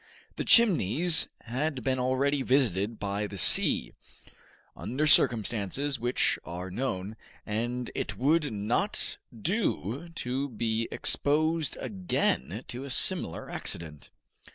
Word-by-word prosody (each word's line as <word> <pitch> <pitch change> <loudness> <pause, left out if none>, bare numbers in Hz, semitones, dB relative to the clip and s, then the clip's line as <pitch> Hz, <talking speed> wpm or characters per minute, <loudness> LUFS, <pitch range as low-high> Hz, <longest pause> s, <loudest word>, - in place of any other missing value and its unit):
The - - -3
Chimneys 175 - +5
had 130 +2 -3
been 130 +1 0
already 135 +3 0
visited 115 -5 0
by 100 +1 -3
the 100 - -9
sea, 90 - +4 0.8
under 135 +6 -2
circumstances 120 +1 +2
which 120 +2 0
are 90 +2 -7
known, 105 -2 -4 0.3
and 120 +3 -3
it 105 - -4
would 150 +4 +1
not 110 - -1
do 145 - -3
to 135 +2 -3
be 115 -1 -1
exposed 155 +1 +1
again 95 - -2
to 125 +2 -5
a 140 - -8
similar 130 - -1
accident. 80 -3 -4
125 Hz, 110 wpm, -28 LUFS, 105-140 Hz, 0.8 s, Chimneys